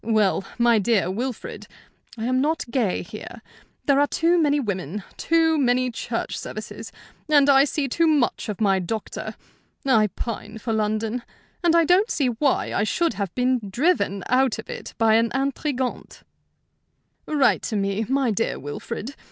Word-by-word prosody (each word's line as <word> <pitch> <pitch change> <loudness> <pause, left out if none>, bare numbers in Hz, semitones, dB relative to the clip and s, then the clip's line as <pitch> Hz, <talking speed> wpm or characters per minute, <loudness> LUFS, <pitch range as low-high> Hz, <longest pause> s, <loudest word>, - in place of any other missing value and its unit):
Well, 215 -4 +2
my 235 -2 +4
dear 200 -4 +1
Wilfrid, 240 +4 -5 0.5
I 225 - -3
am 255 +1 +1
not 315 +3 0
gay 235 -7 0
here. - - -10 0.4
There 280 -1 +4
are 290 - +4
too 335 +4 +2
many 295 -1 +3
women, 200 - -3
too 325 -1 +2
many 255 -1 +2
church 230 - -4
services, - - -7 0.4
and 290 -2 +5
I 275 0 +6
see 290 -1 -1
too 330 +6 +2
much 290 -7 +1
of 205 - -4
my 195 -3 +3
doctor. 210 +4 -5 0.5
I 225 -6 +4
pine 220 +1 -6
for 225 +1 -3
London, 220 +2 -1 0.4
and 340 -1 +4
I 335 -1 +5
don't 370 +7 +4
see 275 -4 +1
why 260 +4 0
I 200 - +1
should 335 +9 +1
have 200 -4 -4
been 255 0 +2
driven 235 - +1
out 255 -1 +2
of 220 - -8
it - - -8
by 225 -1 +4
an 230 0 +2
intrigante. 270 -1 -2 1.0
"Write 285 -4 +3
to 220 - -3
me, 200 +1 0
my 270 -3 +2
dear 225 +2 -1
Wilfrid. 200 - -6
245 Hz, 160 wpm, -23 LUFS, 215-285 Hz, 1.0 s, I